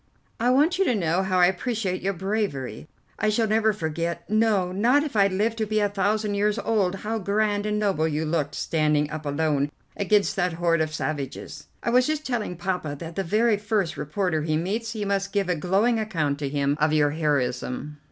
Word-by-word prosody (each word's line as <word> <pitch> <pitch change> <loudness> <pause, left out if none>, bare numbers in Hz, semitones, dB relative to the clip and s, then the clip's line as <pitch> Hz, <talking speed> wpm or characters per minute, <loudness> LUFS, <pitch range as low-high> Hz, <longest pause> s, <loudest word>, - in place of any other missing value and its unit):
"I 240 +2 +2
want 305 +8 +3
you 390 - +4
to 250 - +2
know 175 -2 +1
how 190 -1 0
I 180 - +6
appreciate 190 0 -1
your 195 +2 0
bravery. 190 - -3 0.3
I 215 - +2
shall 225 +2 +2
never 220 +1 +3
forget, 170 -3 -3
no, 215 -4 +2
not 240 +10 +3
if 295 -6 -5
I 200 -2 +5
live 210 +4 0
to 220 -1 -1
be 215 +1 +1
a 205 -1 +2
thousand 205 +1 0
years 205 +1 +1
old, 200 -6 +1
how 225 +1 -1
grand 205 +1 0
and 210 0 0
noble 195 -7 +1
you 155 0 -1
looked 155 -2 -1
standing 150 -2 +1
up 155 -1 -5
alone 145 -1 0 0.3
against 200 0 +2
that 180 -2 +1
horde 170 -1 +1
of 155 -1 -1
savages. 145 -3 -5 0.2
I 235 - 0
was 250 +1 +4
just 310 0 -2
telling 225 -8 -2
Poppa 175 -5 -2
that 165 +2 -8
the 195 - -1
very 215 +4 +2
first 205 -4 -1
reporter 160 +2 -1
he 155 0 0
meets, 215 +7 -2
he 210 -2 -3
must 195 0 -1
give 200 -3 0
a 180 - +2
glowing 200 +9 +1
account 155 -10 -1
to 140 -2 -2
him 140 0 0
of 155 0 +3
your 145 -1 +3
heroism." 145 -1 -2
190 Hz, 205 wpm, -25 LUFS, 155-215 Hz, 0.3 s, I